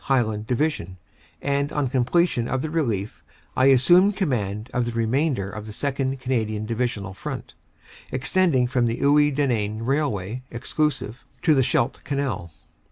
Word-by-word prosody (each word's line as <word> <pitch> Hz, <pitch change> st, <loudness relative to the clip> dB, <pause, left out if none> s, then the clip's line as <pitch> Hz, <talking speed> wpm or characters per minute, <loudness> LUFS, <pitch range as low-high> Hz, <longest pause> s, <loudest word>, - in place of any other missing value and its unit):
(Highland) 110 Hz, -5 st, 0 dB
Division, 125 Hz, -, -1 dB, 0.5 s
and 140 Hz, 0 st, 0 dB
on 145 Hz, -2 st, 0 dB
completion 125 Hz, 0 st, +1 dB
of 130 Hz, 0 st, -1 dB
the 155 Hz, -, -3 dB
relief 115 Hz, -, -2 dB, 0.3 s
I 130 Hz, -, +4 dB
assumed 175 Hz, +10 st, +5 dB
command 110 Hz, -, -1 dB
of 125 Hz, -1 st, +1 dB
the 120 Hz, -, -2 dB
remainder 115 Hz, -2 st, 0 dB
of 105 Hz, 0 st, -7 dB
the -, -, -7 dB
2nd. 135 Hz, +2 st, -2 dB
Cana 125 Hz, -3 st, 0 dB
dian 110 Hz, 0 st, -4 dB
Divisional 115 Hz, -4 st, -2 dB
front, -, -, -6 dB, 0.6 s
extending 135 Hz, 0 st, +2 dB
from 125 Hz, -1 st, +1 dB
the 115 Hz, +1 st, -1 dB
Iwuy 145 Hz, +1 st, +4 dB
Denain 115 Hz, -6 st, 0 dB
rail 140 Hz, +3 st, +1 dB
way 105 Hz, +5 st, -5 dB
(exclusive) 130 Hz, -1 st, -2 dB, 0.2 s
to 155 Hz, -, +5 dB
the 135 Hz, -, +4 dB
Scheldt 120 Hz, 0 st, +1 dB
Canal. 135 Hz, -, -2 dB
125 Hz, 155 wpm, -24 LUFS, 110-140 Hz, 0.6 s, assumed